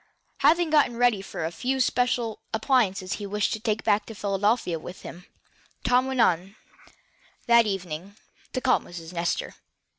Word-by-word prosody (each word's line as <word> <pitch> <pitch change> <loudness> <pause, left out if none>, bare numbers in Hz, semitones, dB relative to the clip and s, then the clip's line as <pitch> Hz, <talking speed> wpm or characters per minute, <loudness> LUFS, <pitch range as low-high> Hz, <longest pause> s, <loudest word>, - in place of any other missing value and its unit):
Having 335 -1 +3
gotten 285 -6 +3
ready 240 -5 +3
the 165 -4 -4
few 260 +8 -2
special 245 -3 0 0.2
appliances 215 -6 +1
he 205 - -5
wished 210 +1 0
to 215 - -3
take 220 -1 -1
back 205 0 +2
to 225 - -8
Philadelphia 200 -3 0
with 175 +3 -10
him, 175 +2 -10 0.6
Tom 250 +1 +3
went, 195 -7 +1 0.9
that 235 -1 +5
evening, 190 -1 -5 0.4
to 255 - -2
call 255 -1 +4
on - - -13
Miss 170 -1 -9
Nestor. 170 0 -2
210 Hz, 150 wpm, -26 LUFS, 185-245 Hz, 0.9 s, that